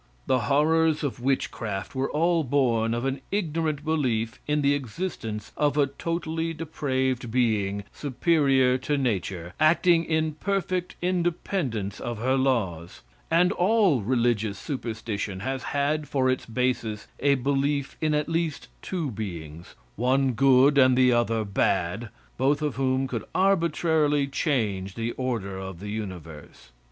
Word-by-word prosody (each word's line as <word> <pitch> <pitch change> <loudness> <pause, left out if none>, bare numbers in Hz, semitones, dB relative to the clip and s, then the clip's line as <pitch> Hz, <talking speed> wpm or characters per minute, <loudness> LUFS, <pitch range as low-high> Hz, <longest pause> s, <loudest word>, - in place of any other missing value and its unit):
The 130 - +2
horrors 155 +2 +3
of 140 -4 -3
witchcraft 115 -6 -2
were 130 +1 -1
all 165 +1 +2
born 120 -4 +1
of 120 +2 -2
an 135 0 -2
ignorant 160 -6 -1
belief 120 -8 0
in 150 0 +1
the 140 0 +4
existence 120 - -4
of 145 -1 +1
a 145 - +5
totally 165 +3 -3
depraved 130 -6 -2
being 105 -4 +1
superior 135 -3 +2
to 145 +3 -1
nature, 95 -9 -2
acting 165 +2 +4
in 160 -1 0
perfect 185 +1 -2
independence 170 - -1
of 120 -1 -4
her 130 +4 +1
laws; 105 -11 -1 0.3
and 180 +2 +4
all 195 - +3
religious 115 -3 0
superstition 110 - -4
has 130 +4 -3
had 145 +1 0
for 130 -2 +1
its 130 - -3
basis 115 -3 -1
a 140 0 +3
belief 140 +1 0
in 155 -1 +2
at 150 0 0
least 165 -2 -2
two 165 -7 -3
beings, 85 -6 -7 0.2
one 130 +3 +2
good 135 +3 +5
and 130 -1 +5
the 130 -1 +5
other 115 -2 +1
bad, 100 +2 0 0.3
both 140 +3 +2
of 150 -3 0
whom 130 0 +1
could 115 -5 -4
arbitrarily 160 -6 +2
change 110 - -1
the 115 +1 -2
order 115 -8 -3
of 95 -2 -7
the 105 +2 -7
universe. 85 - -8
130 Hz, 140 wpm, -26 LUFS, 115-155 Hz, 0.3 s, a